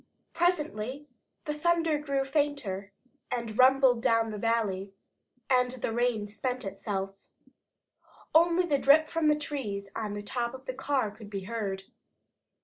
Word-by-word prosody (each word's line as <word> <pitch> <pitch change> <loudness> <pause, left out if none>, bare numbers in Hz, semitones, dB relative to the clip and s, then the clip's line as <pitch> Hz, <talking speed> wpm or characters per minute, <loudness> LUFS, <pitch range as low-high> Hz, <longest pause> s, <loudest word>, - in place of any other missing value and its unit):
Presently 295 -7 0 0.4
the 300 - -1
thunder 330 0 +2
grew 280 -2 -1
fainter, 270 -9 -1 0.4
and 235 -3 -3
rumbled 260 -1 +6
away - - -7
down 230 -1 +2
the 210 - -5
valley, 200 -4 -1 0.5
and 250 -1 +3
the 245 -3 -3
rain 235 -3 +1
spent 250 +3 -3
itself. 195 0 -3 1.2
Only 340 +2 +5
the 290 -5 +1
drip 310 +4 +5
from 325 -2 +1
the 300 - +5
trees 215 -10 -4
on 210 -2 -3
the 205 - -5
top 235 +3 -2
of 260 0 -12
the 255 - -3
car 265 -4 0
could 210 0 -12
be 200 -1 -4
heard. 195 -2 -3
250 Hz, 145 wpm, -29 LUFS, 210-290 Hz, 1.2 s, rumbled